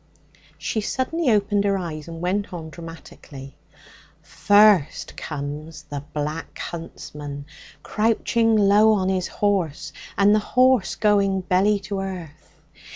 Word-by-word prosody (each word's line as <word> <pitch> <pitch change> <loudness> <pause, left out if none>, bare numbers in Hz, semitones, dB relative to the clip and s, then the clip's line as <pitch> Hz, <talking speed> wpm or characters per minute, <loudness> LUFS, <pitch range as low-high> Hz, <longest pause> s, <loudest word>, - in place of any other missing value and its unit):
She 220 - -2
suddenly 265 +7 -1
opened 205 -2 +2
her 200 -1 +1
eyes 160 -4 -6
and 165 0 -8
went 195 +3 -1
on 160 -3 -7
dramatically 155 -5 -11 0.7
'First 205 -6 +3
comes 150 +2 -6
the 145 -1 -7
Black 150 +2 -4
Huntsman, 145 -4 -7 0.4
crouching 225 +1 +1
low 210 +1 +5
on 190 -3 +1
his 185 -2 0
horse 165 -7 -1 0.2
and 200 +1 +5
the 215 - +4
horse 255 0 +2
going 200 -2 +2
belly 190 +3 +2
to 195 0 -4
earth. 180 -6 -8
190 Hz, 120 wpm, -23 LUFS, 160-210 Hz, 0.7 s, low